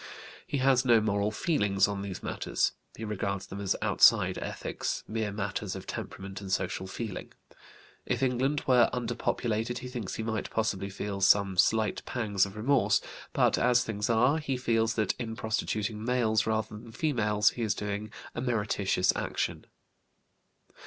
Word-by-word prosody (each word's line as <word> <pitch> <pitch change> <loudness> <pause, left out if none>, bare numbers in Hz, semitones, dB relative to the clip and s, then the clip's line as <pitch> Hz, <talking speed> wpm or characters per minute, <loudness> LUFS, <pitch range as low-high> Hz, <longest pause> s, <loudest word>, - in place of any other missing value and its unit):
He 145 - -1
has 130 -1 +4
no 120 -3 +5
moral 100 -1 +1
feelings 100 - +2
on 100 -1 -3
these 100 -2 -6
matters; - - 0 0.3
he 110 - -5
regards 100 -2 -2
them 100 +1 -7
as 100 - +1
outside - - +5
ethics, - - -4
mere 110 -1 -2
matters 100 -1 -3
of 95 - -7
temperament 95 +1 -6
and 95 -1 -6
social 95 0 -1
feeling. 105 +1 -6 0.7
If - - 0
England 130 +3 +1
were 125 -3 +5
underpopulated 120 -1 -1
he 125 - -6
thinks 120 -6 -5
he 110 - -3
might 110 -1 -2
possibly 105 -3 -1
feel 100 0 -4
some 100 0 +4
slight 110 +3 +2
pangs 105 -5 0
of 100 - -11
remorse; 130 +5 +3 0.3
but, - - +3
as 125 0 +4
things 105 -2 -3
are, 125 +7 +3
he 135 -4 -2
feels 115 -2 +1
that 110 -4 +1
in 115 -2 -4
prostituting 110 -1 -2
males 115 -3 +1
rather 110 0 0
than 115 +1 -12
females 110 -6 +2
he 120 - -6
is 110 -3 +1
doing 105 +1 -4 0.2
a - - -4
meritorious 105 -6 +1
action. - - -3
110 Hz, 160 wpm, -29 LUFS, 100-120 Hz, 0.7 s, no